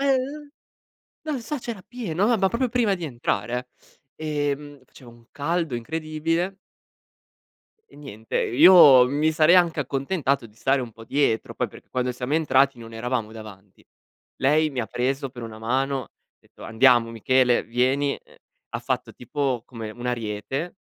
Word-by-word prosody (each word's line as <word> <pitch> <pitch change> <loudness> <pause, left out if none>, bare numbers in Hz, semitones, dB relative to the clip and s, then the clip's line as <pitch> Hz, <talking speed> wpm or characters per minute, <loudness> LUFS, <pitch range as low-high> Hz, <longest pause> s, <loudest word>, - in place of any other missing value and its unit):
Ehm, 280 +2 -1 0.7
non 300 -5 -3
so, 300 +6 -4
c'era 230 -5 -7
pieno, 205 -5 -2
ma 235 0 +3
ma 195 -2 +2
proprio 245 +5 -1
prima 230 -4 +1
di 175 -3 -6
entrare, 120 -2 -3 0.5
eh. 150 -2 -1
E - - -2
mhmm 145 -1 -13
faceva 125 -2 -16
un 115 0 -19
caldo 165 -1 -2
incredibile 160 +7 -2 1.3
e - - -18
niente. 115 -7 -7
Io 140 -3 +8
mi 150 +4 +1
sarei 155 +2 +5
anche 170 -4 +3
accontentato 140 -1 -1
di 105 - -22
stare 135 +3 +1
un 120 -2 -8
po' 115 +1 -13
dietro. 135 -4 0
Poi, - - -2
perché - - -16
quando 125 0 -1
siamo 125 +3 -3
entrati 135 -4 +3
non 115 -1 -11
eravamo 115 -1 -3
davanti. 105 -3 -13 0.5
Lei 155 +3 +3
mi 130 -3 -3
ha 110 - -3
preso 135 +2 -2
per 125 -2 -10
una 110 -1 -8
mano, 135 +4 -1
ha - - -22 0.3
detto: - - -16
"Andiamo 120 +1 +4
Michele, 125 +2 +2
vieni". 130 +4 +1
Ehm, - - -22 0.4
ha - - -2
fatto, - - -3
tipo 130 -1 -2
come 115 -4 -8
un 120 +3 -10
ariete, 125 - -3
135 Hz, 165 wpm, -24 LUFS, 120-160 Hz, 1.3 s, Io